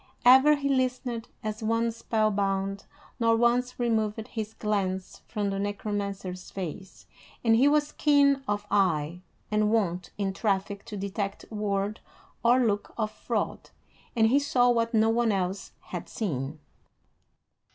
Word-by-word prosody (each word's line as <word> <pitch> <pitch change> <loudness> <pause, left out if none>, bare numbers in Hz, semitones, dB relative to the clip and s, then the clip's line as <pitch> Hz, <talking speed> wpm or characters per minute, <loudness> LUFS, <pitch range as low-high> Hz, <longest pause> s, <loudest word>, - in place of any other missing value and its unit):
Ever 265 +4 +8
he 280 -1 -2
listened, 255 -3 -1 0.2
as 215 +1 -4
one 230 +1 +1
spellbound, 200 -3 -1 0.3
nor 230 -1 +4
once 245 +2 +1
removed 220 -1 0
his 220 -1 -5
glance 190 -3 -2
from 205 -3 -2
the 195 - -2
Necromancer's 200 -2 -4
face; 190 0 -7 0.4
and 225 -1 +5
he 255 +5 +5
was 295 0 +2
keen 280 -2 +4
of 205 0 -1
eye, 170 -4 +1 0.3
and 210 0 +2
wont 180 -5 0
in 195 -2 -1
traffic 200 -1 -1
to 210 - -7
detect 200 +1 -4
word 205 0 -1 0.4
or 245 +2 +5
look 205 -4 -1
of 215 -2 -1
fraud, - - -3 0.5
and 225 -2 +4
he 275 +4 +4
saw 250 -4 +3
what 230 0 +1
no 220 0 +4
one 235 -1 +2
else 190 0 -2
had - - -7
seen. 150 - -3
215 Hz, 140 wpm, -27 LUFS, 195-235 Hz, 0.5 s, Ever